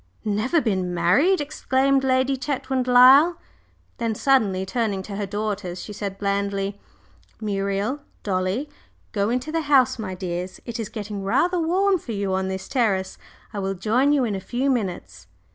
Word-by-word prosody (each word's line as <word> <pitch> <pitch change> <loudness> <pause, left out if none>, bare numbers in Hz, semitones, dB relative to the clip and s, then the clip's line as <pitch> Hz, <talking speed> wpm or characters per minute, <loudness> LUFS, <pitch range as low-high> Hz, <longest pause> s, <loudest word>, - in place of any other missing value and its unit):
"Never 215 +10 +1
been 185 - -1
married!" 260 - +3
exclaimed 275 -1 +1
Lady 260 +1 +2
Chetwynd 265 -1 -2
Lyle, 265 +7 +7 0.6
then 230 -2 -1
suddenly 210 -8 +2
turning 200 -2 -1
to 200 +1 -7
her 200 0 -3
daughters 205 -3 -3
she 210 - -8
said 200 -1 -5
blandly: 200 0 -2 0.6
"Muriel, 200 +4 -1 0.2
Dolly, 190 +7 -1 0.4
go 205 0 0
into 255 +5 -2
the 325 0 0
house, 275 -6 +3
my 190 -4 -4
dears. 180 0 -5
It 235 -1 -5
is 220 -3 -4
getting 205 -2 -6
rather 350 - +1
warm 375 +3 +2
for 235 - -6
you 200 -2 -2
on 190 0 0
this 190 0 -5
terrace. 200 -8 0 0.3
I 205 - -3
will 195 0 -2
join 230 +9 +2
you 285 -3 +3
in 215 - -2
a 195 - -2
few 255 +7 -1
minutes." 175 - -4
215 Hz, 160 wpm, -23 LUFS, 195-265 Hz, 0.6 s, Lyle